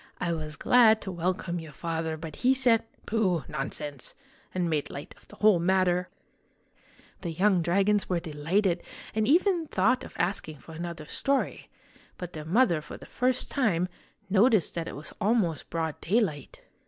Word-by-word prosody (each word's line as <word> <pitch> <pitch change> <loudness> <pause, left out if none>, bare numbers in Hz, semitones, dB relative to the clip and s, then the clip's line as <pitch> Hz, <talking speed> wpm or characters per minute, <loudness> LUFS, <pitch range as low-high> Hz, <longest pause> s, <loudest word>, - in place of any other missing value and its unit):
I 170 -1 0
was 155 -2 -4
glad 220 +3 +5
to 190 - -4
welcome 175 0 -2
your 160 -2 -10
father; 160 0 -3
but 155 -1 -8
he 260 +2 +3
said, 245 -4 +4
' - - -32
Pooh! 190 - +1
nonsense! 145 -1 -5 0.2
' - - -31
and 180 -2 -1
made 155 -3 -1
light 140 - -8
of - - -22
the - - -14
whole 210 -4 +4
matter! 180 0 +2 0.5
" - - -30
The 175 - -3
young 185 +2 +3
dragons 195 +4 +2
were 180 -2 +1
delighted, 170 +4 0 0.3
and 215 0 +1
even 345 +2 +3
thought 250 +5 +2
of - - -11
ask 175 -2 -1
ing 155 - -9
for 160 - -14
another 170 -1 -6
story; 275 - -1 0.5
but 180 -1 -7
their 155 -1 -7
mother, 175 -2 +3
for 150 - -9
the - - -12
first 255 +1 0
time, 190 - +1 0.4
noticed 205 - +4
that 170 -1 -3
it - - -6
was 150 +2 -9
almost 200 -7 +1
broad 160 -2 -3
daylight. 175 - -1
180 Hz, 180 wpm, -28 LUFS, 160-215 Hz, 0.5 s, glad